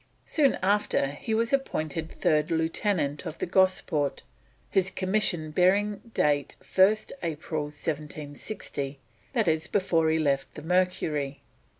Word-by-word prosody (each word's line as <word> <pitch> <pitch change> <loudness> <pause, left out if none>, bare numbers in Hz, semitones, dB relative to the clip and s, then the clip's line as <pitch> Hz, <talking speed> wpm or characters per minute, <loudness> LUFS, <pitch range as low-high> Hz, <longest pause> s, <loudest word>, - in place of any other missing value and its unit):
Soon 290 -4 +3
after 200 -8 +2
he 220 +10 -3
was 230 +3 +1
appointed 160 - -1
third 150 -1 +1
lieutenant 160 -2 0
of 155 - -6
the - - -2
Gosport, 180 -5 +1 0.4
his 190 0 +2
commission 185 -5 0
bearing 200 +5 +3 0.2
date 145 -1 +1
1st 205 +3 +3
April 155 -2 -3
1760, 145 0 -5 0.4
that 225 -5 +1
is 160 -1 +1
before 165 -5 +2
he 160 - +2
left 140 -3 0
the 150 - -8
Mercury. 155 -6 0
160 Hz, 120 wpm, -27 LUFS, 150-190 Hz, 0.4 s, Soon